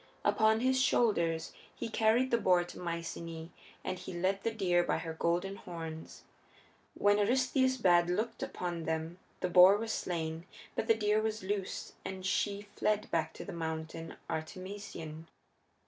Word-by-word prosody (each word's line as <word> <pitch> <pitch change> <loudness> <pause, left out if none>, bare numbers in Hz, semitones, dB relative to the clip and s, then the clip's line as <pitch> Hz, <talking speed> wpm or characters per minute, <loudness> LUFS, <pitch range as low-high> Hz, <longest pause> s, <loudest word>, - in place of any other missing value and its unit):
Upon 220 0 +4
his 260 +1 +3
shoulders 170 -11 +2 0.2
he - - -4
carried 225 +3 +2
the 235 - +3
boar 180 -4 +4
to 175 - -10
Myceaæ 165 -1 -5 0.3
and 185 - -3
he 190 - -7
led 190 +3 0
the 230 - 0
deer 185 -6 +2
by - - 0
her 165 -1 -4
golden 175 +4 0
horns. 165 -4 -8 0.7
When 205 0 +4
Eurystheus 260 +4 +2
bad 175 -6 +4
looked 215 +6 -1
upon 175 -2 -3
them 160 +2 -2 0.2
the - - +1
boar 185 +3 +8
was 225 +1 -3
slain, 165 -1 -3 0.3
but 220 - -1
the 225 - +5
deer 210 0 +2
was 220 -2 -2
loosed 195 0 -3
and 190 0 -6
she 205 +1 0
fled 210 0 0
back 160 -1 +1
to - - -8
the 200 - -6
Mountain 160 0 -4
Artemision. 165 -1 -6
185 Hz, 155 wpm, -32 LUFS, 165-215 Hz, 0.7 s, boar